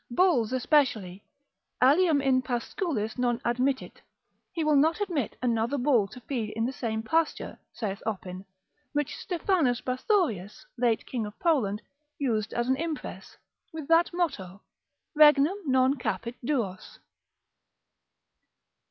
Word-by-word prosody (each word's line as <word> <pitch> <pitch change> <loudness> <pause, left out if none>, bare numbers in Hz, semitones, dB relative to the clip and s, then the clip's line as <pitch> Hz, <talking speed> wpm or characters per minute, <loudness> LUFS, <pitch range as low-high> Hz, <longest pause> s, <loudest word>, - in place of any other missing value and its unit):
Bulls 250 - +2
especially, 245 - +1 0.6
alium 290 +2 +4
in 260 -1 +3
pascuis 250 - -3
non 240 -1 +1
admittit, 255 +3 -1 0.5
he 330 -3 -2
will 305 -1 +3
not 315 +6 +3
admit 340 - -2
another 235 +2 +1
bull 245 -6 +3
to 250 - -12
feed 230 -4 -4
in 225 +1 0
the 260 - -2
same 220 -3 -3
pasture, 320 +7 -1
saith 205 -4 -4
Oppin: 190 -4 -5 0.5
which 295 -2 -1
Stephanus 335 - 0
Bathorius, 255 - -1
late 235 -3 +1
king 230 -4 -3
of 210 - -11
Poland, 235 - +1 0.3
used 220 -6 -1
as 240 0 -1
an 260 0 +2
impress, 320 0 -6 0.3
with 315 -3 -7
that 330 +1 +4
motto, 205 - -3 0.5
Regnum 300 +4 +5
non 260 0 +4
capit 245 -3 -3
duos. 230 -9 -3
255 Hz, 125 wpm, -27 LUFS, 225-300 Hz, 0.6 s, Regnum